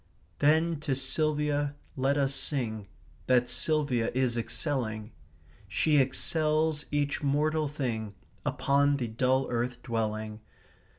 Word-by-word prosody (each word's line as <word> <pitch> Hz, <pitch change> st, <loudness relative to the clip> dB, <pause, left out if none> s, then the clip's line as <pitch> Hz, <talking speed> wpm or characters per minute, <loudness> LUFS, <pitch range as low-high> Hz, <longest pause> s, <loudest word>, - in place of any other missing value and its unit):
/* 85 Hz, +2 st, -35 dB
"Then 160 Hz, +2 st, +3 dB
to 145 Hz, -3 st, -1 dB
Silvia 145 Hz, +1 st, 0 dB, 0.2 s
let 135 Hz, +2 st, +1 dB
us 135 Hz, -1 st, +1 dB
sing, 110 Hz, -8 st, -2 dB, 0.4 s
That 125 Hz, -1 st, +4 dB
Silvia 130 Hz, -3 st, +1 dB
is 130 Hz, -2 st, +2 dB
excelling; 115 Hz, -2 st, -2 dB, 0.6 s
She 150 Hz, +10 st, +2 dB
excels 155 Hz, +2 st, +1 dB
each 145 Hz, -1 st, 0 dB
mortal 150 Hz, +2 st, +1 dB
thing 115 Hz, -8 st, -3 dB, 0.3 s
Upon 140 Hz, +1 st, +2 dB
the 125 Hz, -3 st, -2 dB
dull 130 Hz, +4 st, +1 dB
earth 120 Hz, +1 st, -1 dB
dwelling. 110 Hz, -2 st, -2 dB
135 Hz, 115 wpm, -29 LUFS, 120-150 Hz, 0.6 s, That